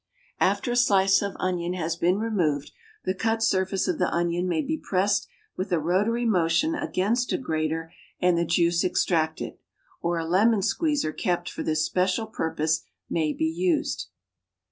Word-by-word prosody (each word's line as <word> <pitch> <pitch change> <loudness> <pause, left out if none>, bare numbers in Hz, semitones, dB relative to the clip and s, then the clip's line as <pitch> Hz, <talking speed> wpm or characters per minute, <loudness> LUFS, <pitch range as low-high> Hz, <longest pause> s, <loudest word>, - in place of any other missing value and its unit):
After 245 - +1
a - - 0
slice 195 -5 +4
of 200 -1 -3
onion 180 -1 -1
has 165 -2 -2
been 175 +3 +2
removed, 175 -10 0 0.3
the 185 - +1
cut 225 +3 0
surface 190 -1 +1
of 350 -5 -1
the - - +2
onion 175 +1 0
may 160 -3 0
be 315 - -1
pressed 195 +2 +1 0.3
with 185 +1 -4
a 175 - +3
rotary 205 +9 +1
motion 180 - +2
against 240 -3 0
a - - +2
grater 160 -6 -2 0.3
and 180 -1 +3
the 170 - +2
juice 170 0 +2
extracted; 160 -3 0 0.4
or 170 0 0
a 165 - -2
lemon 200 +5 +3
squeezer 295 - 0
kept 175 -1 -1
for - - -6
this 155 0 +1
special 185 +4 0
purpose 160 -6 -1 0.3
may 155 -2 +1
be 160 - -1
used. 175 +3 0
180 Hz, 165 wpm, -26 LUFS, 165-205 Hz, 0.4 s, slice